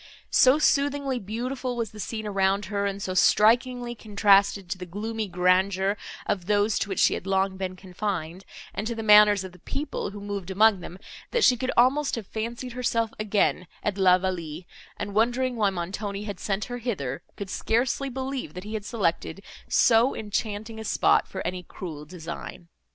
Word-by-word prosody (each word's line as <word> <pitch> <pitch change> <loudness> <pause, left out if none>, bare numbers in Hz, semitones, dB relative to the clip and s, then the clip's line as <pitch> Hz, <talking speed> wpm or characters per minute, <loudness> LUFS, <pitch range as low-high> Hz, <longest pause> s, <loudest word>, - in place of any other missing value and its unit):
So 260 +3 +6
soothingly 280 -3 +1
beautiful 245 +5 -4
was 230 -3 -3
the 215 - -12
scene 220 +1 -4
around 195 0 +1
her, 200 0 +1
and 200 0 -3
so 190 -1 -3
strikingly 240 +5 +3
contrasted 200 -3 +3
to - - -2
the 180 - -7
gloomy 215 +4 -4
grandeur 185 +2 +2 0.3
of 185 -3 -2
those, 205 +1 +2
to - - -2
which 195 - -3
she - - +4
had 190 - -5
long 190 0 +1
been 185 -1 -4
confined, 185 -2 -4 0.3
and 210 - -3
to 235 - -3
the 225 - -4
manners 210 -2 +7
of 190 - -8
the 180 - -17
people, 285 - -4
who 205 +1 -9
moved 200 -2 -5
among 205 +1 +4
them, 175 +1 -9 0.3
that 475 -3 +1
she 250 - +6
could 255 +2 -3
almost 275 +4 +3
have 230 -3 -6
fancied 235 +5 -5
herself 230 -2 0
again 205 -4 +1 0.2
at 210 - -1
La 185 -1 +6
Vallée, 175 -3 -4 0.3
and, 205 - -5
wondering 245 +4 +1
why 210 -3 +2
Montoni 195 +3 -4
had 205 -3 -6
sent 200 0 -2
her 245 0 -6
hither, 160 - -3 0.2
could 200 -1 -6
scarcely 255 +4 0
believe, 260 - -5
that 180 - -6
he 210 +2 -7
had 215 -2 -4
selected 195 -3 -2 0.3
so 235 +2 +4
enchanting 215 +1 -4
a - - -5
spot - - +2
for 190 - -6
any 180 +1 -3
cruel 160 -4 -8
design. 170 +1 -8
205 Hz, 185 wpm, -26 LUFS, 190-230 Hz, 0.3 s, manners